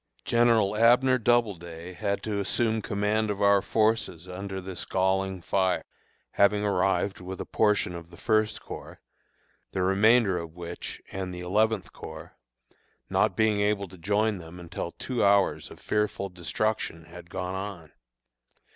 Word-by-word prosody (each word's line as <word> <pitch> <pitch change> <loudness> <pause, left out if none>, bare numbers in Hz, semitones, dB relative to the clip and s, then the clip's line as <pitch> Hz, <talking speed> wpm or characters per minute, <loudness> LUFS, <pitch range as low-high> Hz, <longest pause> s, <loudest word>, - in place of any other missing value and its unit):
General 115 -4 +3
Abner 125 +3 +5
Doubleday 90 -8 0
had 100 +1 -2
to 105 -2 -2
assume 110 +3 0
command 105 +2 0
of 100 -1 -2
our 100 -1 +5
forces 110 -6 0
under 95 +1 -5
this 95 -1 -6
galling 95 -1 0
fire, 95 0 +1 0.5
having 105 +1 +3
arrived 95 0 +1
with 95 +1 -7
a - - -4
portion 105 -4 +1
of 85 -1 -8
the 85 - -14
First 110 -1 +1
Corps, - - -9 0.7
the 95 - 0
remainder 100 0 +4
of 85 -1 -8
which 85 0 -7
and 95 -1 -4
the 90 0 -7
Eleventh 110 +5 +1
Corps, - - -9 0.8
not - - +2
being 110 -2 +3
able 100 -1 +1
to 95 - -13
join 105 +3 +1
them 85 +1 -10
until 85 0 -5
two 125 +6 -3
hours 100 -1 +3
of - - -13
fearful 105 -2 -1
destruction 90 -1 -2
had 85 0 -12
gone 90 +1 -4
on. 95 -4 -6
100 Hz, 145 wpm, -27 LUFS, 90-110 Hz, 0.8 s, Abner